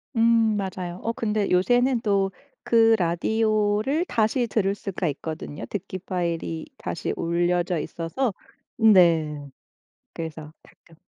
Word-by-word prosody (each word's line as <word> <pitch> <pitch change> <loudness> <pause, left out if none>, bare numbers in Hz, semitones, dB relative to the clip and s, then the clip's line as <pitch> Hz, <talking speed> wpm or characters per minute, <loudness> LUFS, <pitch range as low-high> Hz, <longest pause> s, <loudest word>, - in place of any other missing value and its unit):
음 225 -1 +4
맞아요. 185 -2 -4
어 230 - 0
근데 210 -3 -1
요새는 245 +6 +3
또 195 -2 +1 0.4
그 225 -1 +5
라디오를 215 - +1
다시 230 0 +1
들을 200 -3 +1
수가 195 -3 -4
있거든요. 150 0 -6
듣기파일이 175 -4 -4
다시 - - -4
올려져 175 +1 0
있어서. 190 - -2 0.5
음 220 -1 +7
네 155 -5 +3 0.7
그래서 155 -2 -7
가끔 165 -2 -22
195 Hz, 250 characters per minute, -24 LUFS, 170-220 Hz, 0.7 s, 음